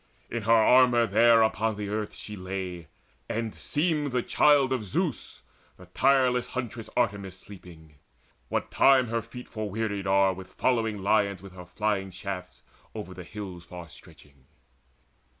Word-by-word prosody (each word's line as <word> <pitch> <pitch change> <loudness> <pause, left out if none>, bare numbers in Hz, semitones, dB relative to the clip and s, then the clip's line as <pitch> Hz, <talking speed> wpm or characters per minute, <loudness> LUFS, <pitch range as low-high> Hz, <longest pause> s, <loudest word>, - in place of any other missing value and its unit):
In 120 - -2
her 110 +2 0
armour 120 +1 +6
there 115 0 +5
Upon 110 0 0
the 105 -1 -5
earth 105 0 -3
she 105 - -8
lay, 95 -3 -5 0.4
and 115 -1 -2
seemed 150 -2 -1
the 125 -1 0
Child 140 -3 +4
Of 125 -4 -2
Zeus, 95 - -3 0.3
the 90 - -14
tireless 125 +5 +2
Huntress 125 -3 -5
Artemis 100 -5 -1
Sleeping, 85 -7 -14 0.5
what - - -2
time 130 -3 +5
her 115 0 -1
feet 125 +2 -11
forwearied 105 -2 -3
are 95 0 +4
With 95 0 -11
following 110 -5 0
lions 100 -2 +1
with 95 -2 -11
her 90 -1 -11
flying 100 +1 -1
shafts 90 -9 -7 0.3
Over - - -6
the - - -9
hills 95 -5 -8
far 85 -1 -10
stretching. 75 -6 -17
105 Hz, 150 wpm, -27 LUFS, 95-120 Hz, 0.5 s, armour